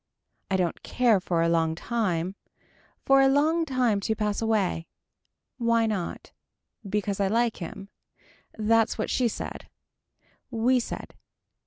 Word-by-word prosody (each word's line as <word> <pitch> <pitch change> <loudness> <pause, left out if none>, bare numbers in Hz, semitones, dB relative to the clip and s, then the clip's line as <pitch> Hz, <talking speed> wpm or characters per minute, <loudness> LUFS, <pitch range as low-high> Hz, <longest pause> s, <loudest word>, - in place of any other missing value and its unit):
I 190 - +2
don't 175 -3 -1
care 240 -5 +2
for 170 -2 0
a - - +2
long 165 -1 +1
time. 185 -4 -1 0.7
For 270 0 +6
a 270 - +6
long 310 +5 +3
time 250 -7 +1
to 220 +2 -1
pass 210 0 -1
away. 205 -7 0 0.7
Why 230 -1 +3
not. 205 -6 -3 0.6
Because 205 -1 -1
I 200 - +2
like 230 +3 +1
him. 195 +3 -8 0.7
That's 225 +1 +2
what - - -2
she 250 - +2
said. 225 - -6 0.8
We 250 +1 +2
said. 235 - -6
220 Hz, 135 wpm, -26 LUFS, 190-240 Hz, 0.8 s, For